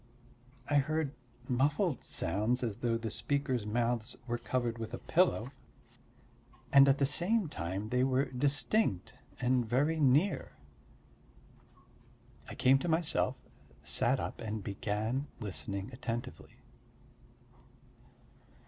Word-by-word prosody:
I 145 - +3
heard 150 0 0 0.3
muffled 145 - +1
sounds 110 +9 0
as 110 -4 -2
though 120 -1 0
the 115 -2 -4
speakers' 125 -1 -1
mouths 115 0 -1
were 120 -1 -2
covered 120 -2 -2
with 115 -1 -4
a - - -6
pillow, 160 -8 +1 1.2
and 140 0 +8
at 135 - +4
the 140 - +3
same 180 +8 +1
time 95 - -4
they 125 +2 +2
were 130 +1 +2
distinct 140 - 0 0.3
and 125 0 +2
very 140 +8 +1
near. 150 +7 +2 2.0
I - - -7
came 135 +1 +4
to 175 - -3
myself, 160 0 +1 0.5
sat - - +2
up - - -5
and 110 -2 -4
began 110 +7 -2
listening 100 - -4
attentively. 120 0 -5
125 Hz, 110 wpm, -32 LUFS, 110-145 Hz, 2.0 s, and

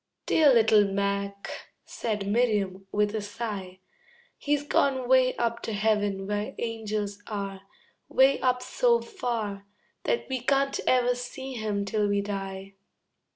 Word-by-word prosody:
"Dear 305 -3 +5
little 220 -3 +6
Mac," 200 0 -2 0.3
said 210 -4 -3
Miriam, 200 -4 0
with 210 0 +1
a 220 - -1
sigh, 205 -3 -6 0.5
"He's 290 0 0
gone 270 -3 +1
way 255 0 +4
up 235 -1 -1
to 225 - -4
heaven 205 -2 +1
where 205 +1 -3
angels 215 -3 -3
are, 200 -3 -4 0.5
Way 270 +1 +4
up 250 -1 +1
so 470 - +2
far 225 - -4 0.4
That 475 - 0
we 260 -1 -2
can't 275 +2 +1
ever 250 -1 +4
see 260 +2 -6
him 210 -4 -2
till 210 +1 0
we 200 0 +1
die." 195 -1 -5
215 Hz, 135 wpm, -27 LUFS, 200-250 Hz, 0.5 s, little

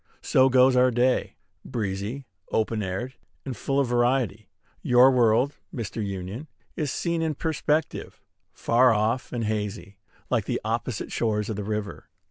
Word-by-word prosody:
So 130 0 +4
goes 130 0 +5
our 125 0 +5
day, 125 +1 +1 0.3
breezy, 105 +4 -4 0.3
open 110 0 0
aired, 100 +7 -4 0.3
and 130 -3 -4
full 135 +6 -1
of 140 - +3
variety. 120 -3 0 0.3
Your 125 +1 +6
world, 125 +2 +3
Mr. 115 -2 -4
Union, 100 - -5 0.3
is 150 -4 -2
seen 170 +1 -1
in 160 -2 -1
perspective, 155 0 -2 0.3
far 125 +2 +3
off 110 +4 0
and 120 -2 -2
hazy, 105 -2 -3 0.3
like - - 0
the - - -1
opposite 115 0 -3
shores 110 -2 -1
of - - -3
the 105 - -4
river. 105 0 -4
120 Hz, 145 wpm, -25 LUFS, 105-130 Hz, 0.3 s, Your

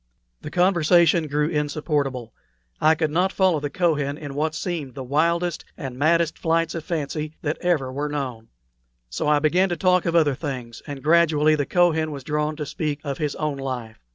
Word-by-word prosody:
The - - -6
conversation 170 -1 +3
grew 150 +1 0
insupportable. 145 -5 -2 0.5
I 155 +1 +5
could 155 -1 -1
not 180 +4 +2
follow 185 -6 +2
the 145 0 -3
Kohen 145 -3 0
in 145 -3 -7
what 155 +2 -1
seemed 155 -7 -4
the 135 - -5
wildest 170 +5 0
and 135 -6 -6
maddest 165 +4 +2
flights 165 0 +1
of 165 - -5
fancy 155 -1 -3
that 155 +1 -2
ever 150 -8 0
were 145 +2 -2
known; 130 -6 -4 0.6
so - - -2
I 150 0 +4
began 175 +6 +2
to 175 - -2
talk 180 +1 +2
of 170 - 0
other 155 -4 +4
things, 125 -5 -6
and 140 -2 -7
gradually 155 -1 +4
the 145 -2 0
Kohen 165 -3 +2
was 140 -3 -7
drawn 150 +2 -1
to 150 -1 -4
speak 150 -1 -3
of 140 -2 -4
his 150 -2 -1
own 150 -2 -2
life. 125 -5 -5
150 Hz, 185 wpm, -23 LUFS, 145-170 Hz, 0.6 s, I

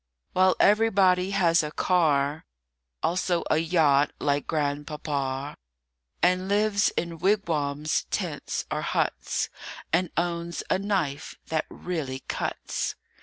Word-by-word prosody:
WHILE 185 0 +4
everybody 195 -4 +4
has 175 -4 +3
a 150 - -3
car, 150 -4 +1 0.6
Also 175 0 +1
a 155 - +4
yacht, 155 -4 +3
like 145 -1 0
Grandpapa, 145 -2 -2 0.7
And 185 +1 +3
lives 205 0 +3
in 170 -1 -2
wigwams, 155 -6 0
tents, - - -3
or - - -1
huts, - - -1 0.4
And 175 +1 +2
owns 170 0 -2
a - - +3
knife 185 -8 -2
that 160 -1 -1
really 145 -7 -4
cuts. - - -3
170 Hz, 110 wpm, -26 LUFS, 145-185 Hz, 0.7 s, WHILE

